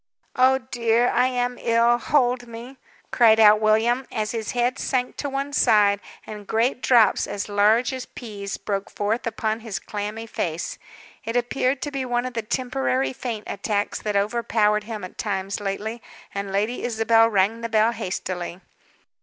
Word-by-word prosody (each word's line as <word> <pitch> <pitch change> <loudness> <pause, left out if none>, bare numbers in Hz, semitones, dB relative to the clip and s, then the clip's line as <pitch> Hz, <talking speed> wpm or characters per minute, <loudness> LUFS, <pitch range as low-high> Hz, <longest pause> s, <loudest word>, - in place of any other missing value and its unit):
"Oh, 260 +1 +5
dear, 240 -2 +1
I 255 - +3
am 245 -1 -2
ill. 235 +1 +3
Hold 245 -3 +1
me!" 235 +3 -10 0.3
cried 225 -2 +5
out 215 -1 +7
William, 230 +4 +2
as 215 0 -2
his 225 -2 -4
head 245 +2 0
sank 250 -2 -1
to 285 - -3
one 275 +1 -3
side, 210 -6 +4 0.3
and 210 -2 -9
great 240 +3 0
drops, 230 -5 +4
as 200 0 -4
large 215 +4 +3
as 260 -1 -6
peas, 200 -4 -7
broke 200 -1 -3
forth 215 +4 -2
upon 220 0 -2
his 220 -3 -5
clammy 210 +2 -5
face. 170 -6 -4 0.4
It 230 - -4
appeared 255 +2 0
to 290 - -3
be 275 -2 -3
one 245 -1 -1
of 255 - -5
the 230 - -2
temporary 255 +3 -1
faint 240 -5 -5
attacks 205 +1 -2
that 210 -1 -2
overpowered 210 0 +1
him 220 -3 -6
at 185 - -9
times 195 -1 -2
lately, 210 +3 -4 0.3
and 200 0 -4
Lady 210 +5 -1
Isabel 225 -1 +3
rang 210 +2 +1
the 230 - -3
bell 220 +1 +3
hastily. 185 -5 -4
225 Hz, 165 wpm, -23 LUFS, 210-245 Hz, 0.4 s, out